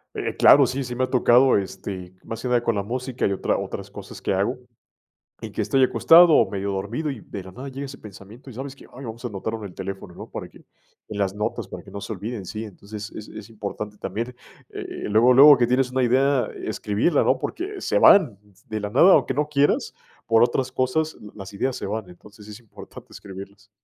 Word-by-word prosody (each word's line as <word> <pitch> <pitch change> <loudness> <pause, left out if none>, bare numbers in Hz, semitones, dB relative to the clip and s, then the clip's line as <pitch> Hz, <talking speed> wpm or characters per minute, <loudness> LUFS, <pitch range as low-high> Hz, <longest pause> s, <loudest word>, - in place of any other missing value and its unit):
Eh, - - -3
claro, 140 -1 +7
sí, 135 +2 -3
sí 125 -1 -6
me 130 - 0
ha 130 - -1
tocado, 125 +1 +4
este, 95 -2 -6
más 115 0 -7
que - - -3
nada 120 -1 +2
con 115 -2 0
la 100 - -1
música 125 +3 -3
y 100 - 0
otra 95 - -1
otras - - -6
cosas - - -10
que - - -1
hago. - - 0 0.9
Y - - -6
que - - -5
estoy 135 - +2
acostado 165 +5 +6
o 110 - +4
medio 100 0 -3
dormido 105 +11 -3
y, 135 - -6
de 95 - -8
la 95 - -11
nada, 130 +8 -8
llega 135 +1 -6
ese 135 0 -10
pensamiento, 105 +5 -13
y, - - -9
¿sabes 135 +3 -7
qué? - - -15
"Ay, 135 +2 -9
vamos 115 +2 -8
a 120 - -1
anotarlo 110 +2 -4
en - - -8
el - - -18
teléfono", 95 -1 -7
¿no? - - -10
Para - - -7
que - - -18 0.5
en 105 - -6
las 100 -1 0
notas, 105 +1 -3
para - - -9
que - - -15
no 100 - -7
se 110 - -6
olviden, 105 +1 -6
sí. 105 +4 -6
Entonces, 105 +1 -9
es 105 - -9
es 110 0 -10
importante 105 -1 -6
también, 115 +6 -5 0.3
eh, - - -7 0.2
luego, 115 +4 +5
luego 145 +2 +9
que 120 - +3
tienes 125 +1 +1
una 130 0 +1
idea, 130 0 +2 0.2
escribirla, 110 +10 0
¿no? 130 - +2
Porque 385 +3 -5
se - - +1
van 140 - +6 0.3
de 110 - -3
la 105 0 -4
nada, 170 - +6
aunque 130 - +2
no 150 +1 0
quieras, 145 -1 +1 0.3
por 115 0 +5
otras 130 +2 -1
cosas, 130 +5 -1 0.2
las 95 -1 -9
ideas 130 +6 -2
se - - -5
van. 105 -1 -4
Entonces, 105 +4 -15
es 105 +2 -10
importante 115 -4 -13
escribirlas. 100 +1 -11
115 Hz, 225 wpm, -23 LUFS, 100-130 Hz, 0.9 s, luego